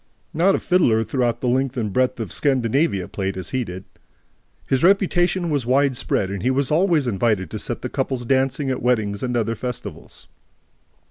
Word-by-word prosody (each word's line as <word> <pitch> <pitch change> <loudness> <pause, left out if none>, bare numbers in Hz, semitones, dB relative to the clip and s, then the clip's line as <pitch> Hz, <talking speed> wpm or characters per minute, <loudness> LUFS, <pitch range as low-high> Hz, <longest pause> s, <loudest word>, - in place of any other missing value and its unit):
Not 185 +5 +3
a - - -1
fiddler 120 -12 +2
throughout 120 -2 -1
the 125 - -1
length 130 +1 0
and 105 -5 -2
breadth 130 -1 +1
of 110 -7 -4
Scandinavia 130 - +1
played 95 -1 -3
as 95 - -6
he 130 -1 0
did. 95 -3 -8 0.8
His 135 +1 0
reputation 180 -2 +2
was 140 -5 -1
widespread 130 -7 +1
and 100 -2 -4
he 125 - +1
was 135 +1 0
always 165 -2 +3
invited 105 -5 0
to - - -4
set - - -4
the - - -1
couples 125 -2 -3
dancing 135 +2 +1
at 130 - -3
weddings 110 -5 0
and 125 -1 -1
other 115 0 0
festivals. 125 +1 -7
125 Hz, 180 wpm, -22 LUFS, 110-140 Hz, 0.8 s, Not